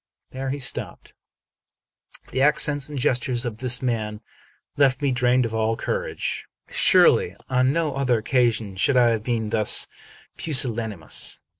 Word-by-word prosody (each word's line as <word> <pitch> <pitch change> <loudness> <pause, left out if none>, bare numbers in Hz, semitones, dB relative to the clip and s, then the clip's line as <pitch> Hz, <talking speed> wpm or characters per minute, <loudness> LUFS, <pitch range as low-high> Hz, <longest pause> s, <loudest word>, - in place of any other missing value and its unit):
There 130 +1 -5
he 140 - -2
stopped. 125 -3 -3 1.2
The 130 - -1
accents 145 0 +1
and 145 - -6
gestures 125 -2 0
of 110 -2 -5
this 125 0 +1
man 110 -4 -2 0.6
left 135 -2 +3
me 140 -2 0
drained 125 0 +2
of 115 - -5
all 110 0 0
courage. - - -3 0.2
Surely, - - +4
on 130 0 +2
no 160 -1 -1
other 130 -3 +1
occasion 115 -3 0
should 130 +7 +2
I 120 -1 +5
have 115 -2 0
been 115 -3 -2
thus 110 -2 +2 0.5
pusillanimous. 115 - 0
125 Hz, 140 wpm, -23 LUFS, 115-135 Hz, 1.2 s, I